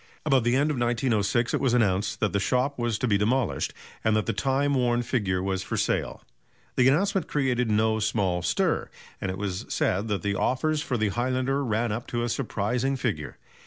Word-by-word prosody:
About 135 -5 +3
the 120 +1 +2
end 145 +3 +2
of 135 - -2
1906 120 -1 +1
it - - +2
was 125 -3 +2
announced 100 -4 +1
that 105 - +1
the 100 - +2
shop 130 +6 0
was 120 -2 0
to 125 - -1
be 100 -3 +2
demolished, 110 - 0 0.3
and 110 -1 +3
that 110 - +1
the - - -1
time 135 +5 +1
worn 120 -2 +2
figure 95 -7 -1
was 95 -1 -1
for 95 - -4
sale. - - -1 0.5
The 125 - +4
announcement 190 +6 +2
created 125 -4 0
no 110 +1 +2
small 100 -5 0
stir, 85 - 0 0.3
and 95 - -2
it 95 - -3
was 95 -2 -4
said 100 +4 0
that 105 -2 -2
the 100 -1 0
offers 150 +8 0
for 130 -6 -2
the 110 -2 +1
highlander 130 +5 0
ran 115 -1 0
up 115 +3 -4
to 120 0 -2
a 120 - -1
surprising 125 +2 -1
figure. 100 - -3
120 Hz, 200 wpm, -26 LUFS, 105-130 Hz, 0.5 s, The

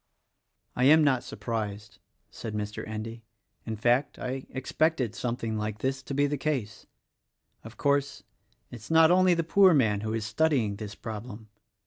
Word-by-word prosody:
"I 125 - +2
am 155 +3 +7
not 130 -4 +2
surprised," 105 -2 -5 0.3
said 110 -2 -6
Mr. 105 0 -4
Endy; 115 +1 -6 0.4
"in 110 - -2
fact, 120 +6 +1
I 130 +1 -5
expected 130 -2 0
something 115 -2 -3
like 105 0 -3
this 130 +4 -2
to 135 +1 -6
be 145 +1 +3
the 145 -1 -2
case. 130 -8 -3 0.8
Of 115 +1 -12
course, 140 -1 0 0.5
it 120 - -7
is 110 - -13
not 160 0 +6
only 185 0 +5
the 165 - 0
poor 185 +1 +5
man 105 -7 +2
who 110 0 -3
is 110 -2 -3
studying 115 -4 +1
this 105 -2 -7
problem. 110 0 -8
120 Hz, 160 wpm, -28 LUFS, 110-145 Hz, 0.8 s, am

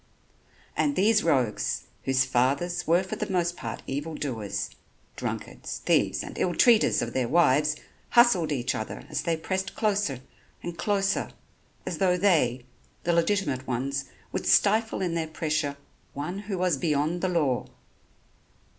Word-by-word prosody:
And 285 -1 +1
these 215 +1 +4
rogues, 130 -9 +1 0.2
whose 135 0 +3
fathers 140 +8 0
were 170 +3 +4
for 185 - -5
the - - -3
most 175 -2 +1
part 115 -8 -6
evil 145 +4 -4
doers, 115 -10 -3 0.4
drunkards, - - -5
thieves - - +2
and - - -8
ill 175 -2 +1
treaters 230 - +5
of 120 - -5
their 130 -2 0
wives, 150 0 +3 0.3
hustled 200 -10 +5
each 125 -4 0
other 110 - -5
as - - -1
they 165 -1 0
pressed 190 +4 -3
closer 200 - 0 0.4
and 175 -1 -5
closer, 195 +3 0 0.6
as - - -4
though 180 -2 +3
they, 150 -10 +2 0.4
the 175 - +1
legitimate 165 -7 +1
ones, 135 +2 -2 0.3
would - - -3
stifle 220 0 +3
in 175 -2 -1
their 165 -1 -1
pressure 150 -2 -1 0.4
one 155 +7 -4
who 205 -1 -4
was 180 -4 +1
beyond 155 +3 0
the 185 - +1
law. 150 -8 +1
165 Hz, 145 wpm, -27 LUFS, 135-190 Hz, 0.6 s, treaters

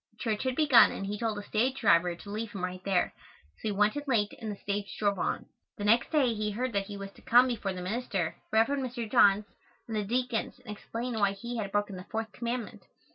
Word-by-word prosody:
Church 215 -2 -1
had 260 -1 0
begun 270 -8 +7
and 195 - -5
he 205 +1 -4
told 225 -3 -1
the 205 - -5
stage 245 +6 0
driver 175 -4 +4
to 200 - -12
leave 215 +1 -4
him 195 -3 -5
right 185 0 -4
there, 190 -2 +1 0.4
so - - -5
he - - +1
went 210 +3 +2
in 290 - -2
late 210 -5 +1
and 220 -2 -4
the - - -5
stage 200 0 -4
drove 200 -2 +1
on. - - -1 0.3
The 205 - -5
next 230 +3 +4
day 275 -7 +3
he 210 -1 -2
heard 240 +4 -2
that 200 -1 0
he 205 -1 -6
was 195 0 -7
to - - -19
come 245 +2 +6
before 215 -5 -2
the 180 -1 -6
minister, 195 -4 -2 0.2
Rev. 220 +1 +5
Mr. 255 -4 -2
Johns, 205 0 +5 0.4
and 225 - -4
the 210 - 0
deacons 245 +2 -1
and 210 - -6
explain 235 +4 -5
why 200 -1 +3
he 235 +4 -6
had 200 -3 -3
broken 205 -2 -1
the 180 - -9
fourth 220 -1 -4
commandment. 235 0 -4
215 Hz, 235 wpm, -30 LUFS, 200-235 Hz, 0.4 s, begun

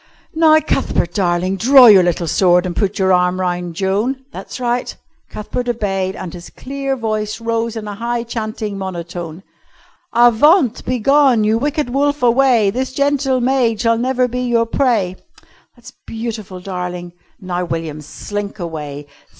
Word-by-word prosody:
"Now, 315 -1 +5
Cuthbert, 175 - -1
darling, 185 0 0
draw 260 +5 +7
your 205 -5 +8
little 175 -1 0
sword 180 +2 +3
and 180 - -4
put 200 -1 -1
your 190 -1 +2
arm 180 0 +2
round 175 -2 -2
Joan. 210 +9 -1
That's - - -8
right." 245 0 -2 0.3
Cuthbert 245 +3 -4
obeyed, 195 -5 -2
and 180 -3 -7
his 175 -1 -10
clear 275 0 -4
voice 215 -2 -3
rose 230 0 -2
in 215 -2 -6
a 205 - -5
high 235 +3 -3
chanting 215 -3 -5
monotone. 175 -2 -6 0.7
"Avaunt! 240 - +4
Begone! 255 -1 +3
You 215 +2 +2
wicked 290 -1 -2
wolf, 285 +1 0
away! 240 -4 +4
This 260 +3 -3
gentle 280 -2 +1
maid 245 -3 +1
shall 230 -1 +2
never 255 0 +1
be 250 +1 -4
your 240 -2 +1
prey." 225 -7 0 0.6
"That's 245 +2 -14
beautiful, 220 -5 -6
darling. 180 -1 -6 0.3
Now, 180 -2 -3
William, 165 -3 -4
slink 205 +7 -6
away. 150 -5 -6
220 Hz, 150 wpm, -17 LUFS, 185-250 Hz, 0.7 s, your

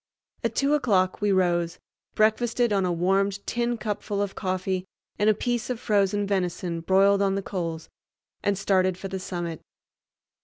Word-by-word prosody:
At - - -1
two 280 +1 +2
o'clock 195 -11 +2
we 205 -1 +2
rose, 175 -3 +1 0.4
breakfasted 230 +1 +2
on 195 -2 +2
a - - 0
warmed 195 +3 +1
tin 240 0 -1
cupful 210 -2 -3
of 200 -1 -1
coffee 185 0 -2 0.4
and 210 +1 +4
a 215 - +4
piece 240 +2 -2
of 250 -3 -2
frozen 205 -1 +1
venison 180 -3 -1
broiled 195 +3 +4
on 195 -1 +2
the 195 - -2
coals, 165 -5 -4 0.5
and 205 -1 +1
started 185 -2 +2
for 195 - -6
the 190 0 -4
summit. 175 -3 -5
195 Hz, 160 wpm, -26 LUFS, 185-210 Hz, 0.5 s, and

